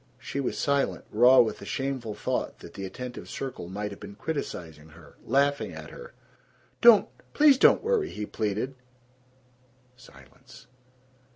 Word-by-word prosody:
She 135 +1 -5
was 135 - -2
silent, 140 -1 0
raw 125 +4 +7
with 110 -3 -1
the - - -10
shameful 130 -5 -3
thought 105 - -3
that - - -13
the 95 - -6
attentive 125 +5 -8
circle 130 -10 -6
might 105 +2 -4
have 100 - -10
been 100 -1 -10
criticizing 80 - -6
her, 80 -1 -17
laughing 140 +3 +1
at - - -9
her. 480 0 -12 0.7
"Don't, 235 -4 +7 0.3
please 290 -3 +6
don't - - +5
worry!" 450 -4 +1
he 105 - -5
pleaded. 110 +5 -3 1.2
"Silence." 130 - -17
125 Hz, 145 wpm, -27 LUFS, 105-140 Hz, 1.2 s, raw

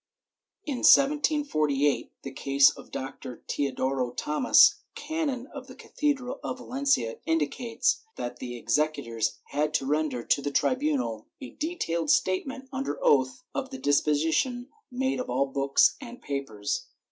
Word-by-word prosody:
* - - -52
In 285 -5 -2
1748 275 - +3
the 135 - -6
case 135 +1 +4
of - - -13
Doctor 130 -2 -7
Teodoro 130 -2 -1
Tomas, 150 - +4 0.2
canon 295 -6 -3
of 270 -2 -8
the 255 - -11
cathedral 270 -2 -2
of 255 - -4
Valencia, 255 - 0
indicates 195 - 0
that 120 0 -5
the 120 -1 -6
executors 120 -2 -1
had 150 +2 -1
to 135 - 0
render 145 -4 -1
to 140 - +1
the 145 - -2
tribunal 255 - 0
a 265 - -8
detailed 170 - -3
statement 260 - 0
under 265 - -3
oath 130 -2 +2
of 270 -1 -3
the 265 - -7
dis 145 - +2
position 160 - 0 0.2
made 260 +1 -1
of 255 - -4
all 135 +2 +1
books 135 0 +2
and 245 -2 -9
papers. 140 - -4
155 Hz, 140 wpm, -27 LUFS, -, 0.2 s, case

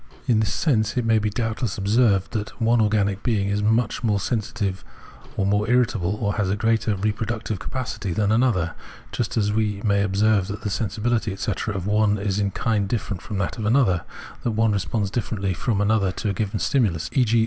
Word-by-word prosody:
In 120 -5 +3
this 105 -2 +1
sense, 115 -3 +1
it 120 - +1
may 115 -1 +4
doubtless 110 0 -2
be 100 - -4
observed 100 -2 +3
that 110 -2 -4
one 115 +1 +3
organic 105 -2 +1
being 105 -5 0
is 100 +1 0
more 110 -1 +1
sensitive, 105 -3 -2 0.5
or 95 - +1
more 105 +2 +1
irritable, 115 -6 +2
or 105 -2 -1
has 100 -3 +1
a 100 - +1
greater 110 0 +1
reproductive 110 +1 -2
capacity 125 -7 -4
than 100 +4 +1
another: 110 -8 +2 0.4
just 120 -1 -2
as 105 -1 +1
we 105 -2 0
may 100 -1 +3
observe 100 0 +2
that 100 0 -6
the 105 - -2
sensibility, 110 +1 -1
etc. 100 +2 -3
of 95 -2 -3
one 105 0 +2
is 100 0 -1
in 100 -1 +1
kind 105 0 0
different 105 -5 -2
from 105 - -5
that 95 +4 -2
of 110 - -2
another, 110 -8 +3 0.4
that 120 - -1
one 110 0 +2
responds 100 +1 -1
differently 100 -5 -2
from 105 +3 -1
another 105 -2 +2
to 105 - -3
a - - 0
given 105 +2 -2
stimulus, 105 - +1
e.g. 120 -4 +3
105 Hz, 190 wpm, -23 LUFS, 100-115 Hz, 0.5 s, may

